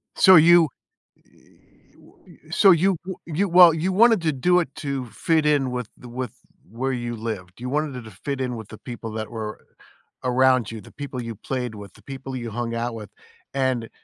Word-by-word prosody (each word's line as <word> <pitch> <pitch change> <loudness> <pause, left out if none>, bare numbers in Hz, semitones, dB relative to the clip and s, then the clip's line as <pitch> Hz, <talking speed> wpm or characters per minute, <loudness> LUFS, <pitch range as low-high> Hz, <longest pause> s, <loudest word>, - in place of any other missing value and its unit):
So, 190 - +7
you, 165 0 +7 0.5
eh - - -34 0.7
w - - -20
so 195 - +6
you 185 +3 +3
w 190 0 -6
you 170 +5 0
well, 175 -1 +8
you 165 +4 -1
wanted 225 +1 +5
to 160 -1 +1
do 180 +7 +3
it 170 - -2
to 140 -4 -4
fit 160 +5 0
in 145 -4 +2
with 125 -3 -4
the 125 - -12
with 125 -1 -5 0.4
where 125 +5 -2
you 120 -1 -4
lived. 105 -5 -6
You 125 +1 -5
wanted 150 0 -1
it 125 - -8
to 110 - -11
fit 135 +7 -5
in 125 -2 -2
with 110 -3 -9
the 110 - -10
people 115 -2 -8
that 110 0 -4
were 110 -2 -6 0.6
around 130 -2 +3
you, 110 -1 -7
the - - -15
people 140 -3 -6
you 115 -1 -6
played 125 +1 -4
with, 100 -1 -11
the - - -19
people 135 -1 -7
you 120 -2 -5
hung 115 +1 -3
out 115 0 -3
with, 105 -3 -8 0.4
and 130 -4 -1
130 Hz, 205 wpm, -23 LUFS, 115-155 Hz, 0.7 s, well